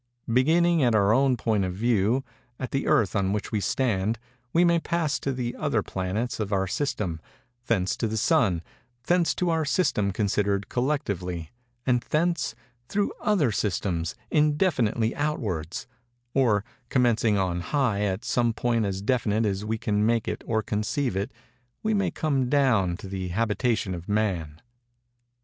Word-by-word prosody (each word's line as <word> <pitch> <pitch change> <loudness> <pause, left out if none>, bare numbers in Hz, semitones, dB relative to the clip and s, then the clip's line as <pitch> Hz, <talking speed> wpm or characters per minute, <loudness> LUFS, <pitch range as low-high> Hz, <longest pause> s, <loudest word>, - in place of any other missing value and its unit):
Beginning 165 +6 +4
at 120 -4 +3
our 100 0 +4
own 130 0 +3
point 110 -3 +1
of 90 -1 -3
view—at 120 +3 -1
the 135 - -1
Earth 140 -11 +3
on 100 -1 +1
which 105 - -3
we 110 - +1
stand—we 120 - 0
may 170 -1 +4
pass 165 -3 -1
to 140 - -2
the 125 -2 -3
other 140 -9 0
planets 95 +7 -3
of 105 -2 -2
our 95 -1 +2
system—thence 105 - -3
to 115 - 0
the 110 +1 -2
Sun—thence 120 - 0
to 180 -2 0
our 160 -1 +1
system 145 - +1
considered 100 0 0
collectively—and 120 - -2
thence, 165 -5 +1 0.3
through 205 0 0
other 180 - +2
systems, 90 -5 -1 0.2
indefinitely 145 - +2
outwards; 105 - -2 0.5
or, 110 -6 +2 0.2
commencing 115 -4 +3
on 90 -2 0
high 120 -3 0
at 100 0 -1
some 120 -2 +1
point 115 -1 0
as 95 0 -3
definite 115 -2 +1
as 100 -1 -1
we 110 +1 -1
can 105 -1 0
make 115 0 +1
it - - -3
or 110 -1 +1
conceive 110 +3 -1
it, 100 +1 -2 0.5
we 220 0 +1
may 200 -2 +1
come 135 -5 0
down 120 -11 +3
to 100 - -9
the 95 -1 -4
habitation 110 +1 0
of 85 +1 -7
Man. 90 -8 -1
115 Hz, 145 wpm, -26 LUFS, 100-135 Hz, 0.5 s, Beginning